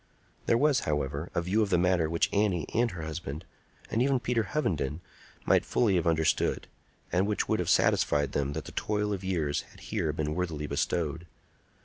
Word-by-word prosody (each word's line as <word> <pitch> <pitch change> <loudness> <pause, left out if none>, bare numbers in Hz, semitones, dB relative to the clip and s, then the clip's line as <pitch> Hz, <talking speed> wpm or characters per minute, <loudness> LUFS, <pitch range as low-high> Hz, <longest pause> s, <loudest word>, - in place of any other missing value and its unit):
There 115 - +4
was, 145 +1 +3
however, 75 +1 -2
a 85 - +1
view 100 +6 +1
of 105 - +1
the 90 - +3
matter 90 -2 +2
which 85 0 0
Annie 100 -5 +1
and 120 +1 +2
her 90 -5 -7
husband, 80 -2 -5 0.5
and 115 - +1
even 135 0 +3
Peter 120 -1 0
Hovenden, 85 - -1 0.5
might - - +4
fully 110 -5 +2
have 85 -2 +1
understood, 80 -1 +1 0.5
and 95 +3 +2
which 105 -2 0
would - - +1
have - - -1
satisfied 75 -2 +3
them 70 0 -1
that 80 - -5
the - - -8
toil 105 -1 -1
of 95 -1 -4
years 80 -6 0
had - - -18
here 80 - -2
been 75 0 -2
worthily 80 -3 -2
bestowed. 80 +3 -1
85 Hz, 190 wpm, -29 LUFS, 75-105 Hz, 0.5 s, There